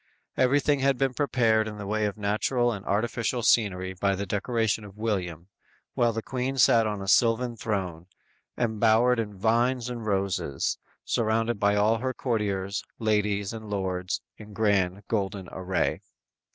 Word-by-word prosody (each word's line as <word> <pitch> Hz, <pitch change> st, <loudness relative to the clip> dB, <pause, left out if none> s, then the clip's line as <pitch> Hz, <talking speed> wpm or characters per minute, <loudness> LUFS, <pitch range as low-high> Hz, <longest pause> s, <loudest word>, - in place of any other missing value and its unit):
Everything 145 Hz, +2 st, +3 dB
had 135 Hz, -1 st, +2 dB
been 135 Hz, -1 st, +1 dB
prepared 115 Hz, -6 st, +2 dB
in 105 Hz, -1 st, -6 dB
the 100 Hz, -, -6 dB
way 105 Hz, +1 st, 0 dB
of 105 Hz, -, -5 dB
natural 115 Hz, +4 st, +1 dB
and 100 Hz, -4 st, -5 dB
artificial 115 Hz, +3 st, -1 dB
scenery 95 Hz, -5 st, +2 dB
by 100 Hz, +1 st, 0 dB
the 100 Hz, +2 st, -3 dB
direction 110 Hz, +2 st, 0 dB
of 100 Hz, 0 st, -12 dB
William, 90 Hz, -6 st, -3 dB, 0.5 s
while 120 Hz, -1 st, +2 dB
the 115 Hz, 0 st, -4 dB
Queen 130 Hz, +1 st, -3 dB
sat 115 Hz, -2 st, +5 dB
on 105 Hz, -2 st, -3 dB
a -, -, -7 dB
sylvan 120 Hz, +3 st, +3 dB
throne, 95 Hz, -7 st, -3 dB, 0.5 s
embowered 115 Hz, +1 st, +3 dB
in 105 Hz, -3 st, -4 dB
vines 120 Hz, +4 st, +1 dB
and 115 Hz, -3 st, -6 dB
roses, 95 Hz, -8 st, -1 dB, 0.3 s
surrounded 115 Hz, 0 st, 0 dB
by 100 Hz, 0 st, +3 dB
all 110 Hz, +2 st, +3 dB
her 130 Hz, +2 st, -2 dB
courtiers, 100 Hz, -4 st, -1 dB, 0.2 s
ladies 105 Hz, -2 st, 0 dB
and 110 Hz, -2 st, -8 dB
lords, 95 Hz, 0 st, -2 dB, 0.2 s
in 105 Hz, -1 st, -11 dB
grand, 100 Hz, -2 st, +1 dB
golden 100 Hz, -3 st, -2 dB
array. 95 Hz, 0 st, -1 dB
110 Hz, 150 wpm, -27 LUFS, 100-115 Hz, 0.5 s, sat